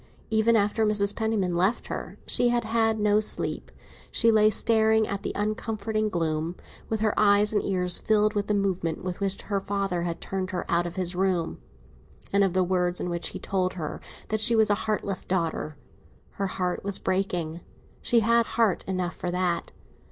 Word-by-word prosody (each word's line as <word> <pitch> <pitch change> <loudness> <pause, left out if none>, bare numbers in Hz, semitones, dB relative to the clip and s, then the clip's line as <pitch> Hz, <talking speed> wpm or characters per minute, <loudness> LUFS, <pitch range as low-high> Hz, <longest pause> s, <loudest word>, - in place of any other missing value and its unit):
Even 220 +1 +3
after 210 +1 +2
Mrs. 205 -1 +2
Penniman 215 -6 0
left 190 +7 +1
her - - -6
she 245 - +3
had 240 0 +1
had 225 0 +1
no 210 0 +3
sleep. 215 - -3 0.4
She 230 - +3
lay 215 -1 +5
staring 220 0 +3
at 200 0 -3
the - - -3
uncomforting 215 +1 -2
gloom, 165 -1 -2 0.3
with 220 -1 -1
her 215 -1 +2
eyes 210 0 +4
and 205 - +1
ears 180 -2 +1
filled 215 -1 +2
with 205 -1 -1
the 210 - +1
movement 185 -5 -1
with 180 -1 -4
which 195 -1 -1
her 200 -2 -1
father 195 -3 -2
had 170 -1 -3
turned 190 -1 -4
her 185 -2 -3
out 175 0 +1
of 170 - -8
his 180 -1 -2
room, 180 -3 0 0.7
and 200 0 +4
of 190 -3 +1
the 185 0 +3
words 180 -1 0
in 180 - -3
which 170 0 -1
he - - -6
had - - -14
told 185 -2 0
her 155 -5 -5 0.3
that 215 0 0
she 230 +1 +5
was 220 -1 +4
a 210 +1 -1
heartless 200 -3 -1
daughter. 165 -4 -2 0.5
Her 195 - -3
heart 180 -1 -2
was 200 -1 +1
breaking. 175 -3 -2 0.4
She 235 -1 +3
had 235 +1 +3
heart 225 -6 +1
enough 185 -2 -2
for 180 - -2
that. 175 -1 -1
200 Hz, 190 wpm, -26 LUFS, 180-215 Hz, 0.7 s, lay